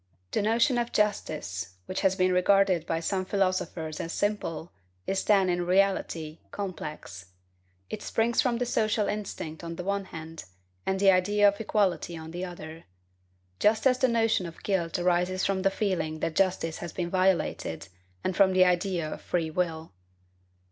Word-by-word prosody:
The - - +1
notion 230 +4 +3
of 240 0 -2
justice 125 - -1
which 185 - -3
has 190 -1 +3
been 185 -1 +2
regarded 185 -2 +3
by 165 0 -1
some 185 +2 -1
philosophers 185 -5 -1
as 165 - -4
simple 175 -5 -2 0.3
is 195 0 -1
then, 195 -3 +4
in 175 -1 0
reality, 175 -4 +1
complex. 155 - -6 0.6
It 215 - -6
springs 230 +2 +1
from 250 -4 +1
the 245 - -1
social 215 -3 +1
instinct 190 -6 -5
on 165 0 -5
the 180 - -5
one 200 +1 -1
hand, 160 -2 -9 0.4
and 190 0 +1
the 195 0 +6
idea 205 +3 +4
of 200 +1 +1
equality 185 -6 0
on 160 0 -8
the 175 +2 -5
other; 165 -3 -8 0.7
just 220 +3 +3
as 255 -1 +4
the 260 - +4
notion 225 -6 +2
of 165 - -12
guilt 175 -5 0
arises 180 +1 +1
from 195 -1 0
the 195 - +3
feeling 170 -6 -1
that 165 -1 -1
justice 180 -4 +1
has 175 - -6
been 175 0 -3
violated, 185 - 0 0.4
and 185 - -1
from 190 -1 +5
the 185 0 +6
idea 180 -2 +1
of - - -6
free 165 -3 -1
will. 160 - -2
185 Hz, 170 wpm, -28 LUFS, 165-200 Hz, 0.7 s, the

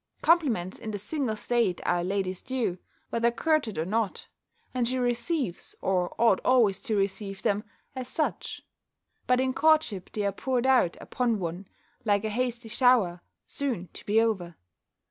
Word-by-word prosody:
Compliments 255 - +2
in 220 - -6
the 210 - -3
single 230 +2 -2
state 220 -5 0
are 175 - +2
a - - -1
lady's 185 0 -2
due, 240 -9 -2 0.3
whether 235 0 +2
courted 260 - 0
or 160 - 0
not; 215 +1 -2 0.4
and 250 -2 +1
she 255 +2 -1
receives, 245 - -1
or 180 -2 0
ought 230 -5 +4
always 225 -7 +4
to 225 -6 -1
receive 195 0 -2
them, 205 +1 +1 0.3
as 255 -1 -4
such; 310 +4 -2 0.6
but 250 0 +4
in 260 0 +1
courtship 310 - +2
they 210 -1 -2
are 200 - +2
poured 250 +4 -1
out 255 -10 +3
upon 240 -3 0
one, 180 +1 -5 0.4
like 205 -2 +2
a - - 0
hasty 240 0 -2
shower, 225 -7 +3 0.2
soon 235 - -3
to - - -9
be 210 +2 +4
over. 190 -7 0
225 Hz, 165 wpm, -28 LUFS, 195-255 Hz, 0.6 s, ought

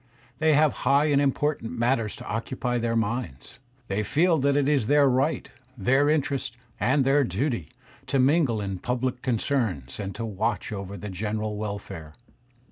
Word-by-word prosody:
They 155 0 +4
have 150 0 +3
high 145 +2 +3
and 140 0 +4
important 140 -3 0
matters 115 -2 +1
to - - -10
occupy 120 +2 -2
their 115 0 -1
minds. 115 - -3 0.3
They 100 +2 -1
feel 160 - +2
that 140 +1 +2
it 145 -1 +2
is 140 -7 +2
their 145 0 +5
right, 135 +4 +1 0.3
their 135 +8 +3
interest, 140 -5 -1 0.2
and 135 +2 +3
their 140 +2 +4
duty, 115 - -2 0.4
to 140 - +1
mingle 135 -3 +3
in 95 -2 -4
pubUc 125 +2 -2
concerns, 110 - -1
and 100 -2 -4
to 115 - -4
watch 110 +1 -2
over 100 -1 -5
the 105 - -6
general 105 +2 -3
welfare. 100 -7 -6
120 Hz, 160 wpm, -26 LUFS, 105-140 Hz, 0.4 s, their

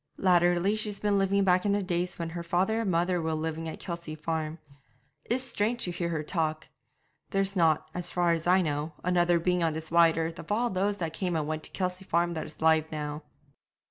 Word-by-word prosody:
Latterly 175 +2 +3
she's 210 -2 -2
been 205 -1 +2
living 195 +1 +2
back 180 -1 +3
in 205 - +2
the 205 0 0
days 180 -1 -2
when 170 -1 -3
her 170 +1 -4
father 185 +6 +1
and 215 - -1
mother 175 0 +1
were 160 0 -1
living 160 +1 -3
at - - -8
Kelsey 170 -3 -5
Farm. 160 0 -3 0.7
It's 250 +2 -1
strange 235 -1 -1
to 180 - -1
hear 170 0 -2
her 160 -2 -2
talk. 155 -1 -2 0.6
There's 195 0 0
not, 160 -4 +3
as 180 0 0
far 175 -1 +2
as 165 0 0
I 185 +1 +5
know, 150 0 -2
another 175 -1 +3
being 180 +1 +1
on 165 -2 +1
this 160 +1 -6
wide 170 -1 +5
earth 165 +1 -2
of - - -8
all 235 +3 +1
those 200 +2 0
that 165 -4 -3
came 180 -1 -2
and 155 -2 0
went 155 +1 -3
to - - -8
Kelsey 185 0 -3
Farm 170 0 +1
that 160 - -4
is 155 - -12
alive 160 -1 +4
now.' 150 -1 -4
175 Hz, 220 wpm, -28 LUFS, 160-190 Hz, 0.7 s, I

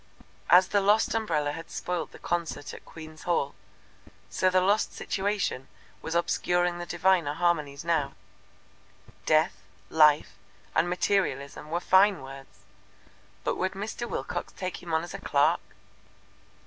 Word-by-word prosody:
As 185 +1 +7
the 205 - +2
lost 205 +3 +3
umbrella 165 -10 0
had 165 +2 -8
spoilt 175 -2 -3
the - - -12
concert 170 -4 -3
at - - -11
Queen's 155 -1 -11
Hall, 155 -5 0 0.8
so 185 - +2
the 185 0 +3
lost 200 +4 +2
situation 200 -9 -2 0.3
was 160 - -4
obscuring 175 0 +1
the 175 - -6
diviner 175 -4 +2
harmonies 155 -4 0
now. 150 -5 0 1.1
Death, 155 0 +3 0.3
Life 155 -1 +4 0.3
and 175 - +2
Materialism 175 -6 -1
were 170 +2 0
fine 190 -1 +4
words, 135 -3 -12 0.8
but - - -1
would 185 0 -1
Mr. 220 +4 -5
Wilcox - - -4
take 185 -1 -5
him 175 - -8
on 160 0 +1
as 175 - -8
a 195 - -6
clerk? 145 -5 +2
175 Hz, 135 wpm, -28 LUFS, 155-185 Hz, 1.1 s, As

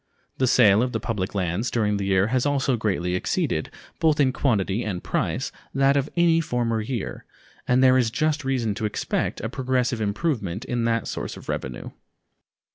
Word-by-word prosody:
The 130 - +3
sale 110 -4 +5
of 125 0 -1
the - - 0
public 105 -4 -3
lands 95 +5 -1
during 105 -3 +1
the 100 - -2
year 95 0 +3
has 130 -1 +2
also 140 -2 +1
greatly 95 -6 -1
exceeded, 90 - -1 0.3
both 155 -2 +3
in 130 -3 +3
quantity 110 -5 0
and 95 -4 -4
price, - - -1 0.2
that 135 +1 +4
of 140 +1 0
any 165 -1 +4
former 120 -6 -1
year, 115 -1 -4 0.4
and 125 +1 +4
there 130 0 +6
is 120 -3 +2
just 155 +4 0
reason 125 -5 0
to 110 - -3
expect 105 - -2
a 110 - -2
progressive 125 -1 -1
improvement 105 - -2
in 120 -2 -1
that 115 0 0
source - - -5
of - - -12
revenue. 65 -2 -4
120 Hz, 180 wpm, -24 LUFS, 105-130 Hz, 0.4 s, there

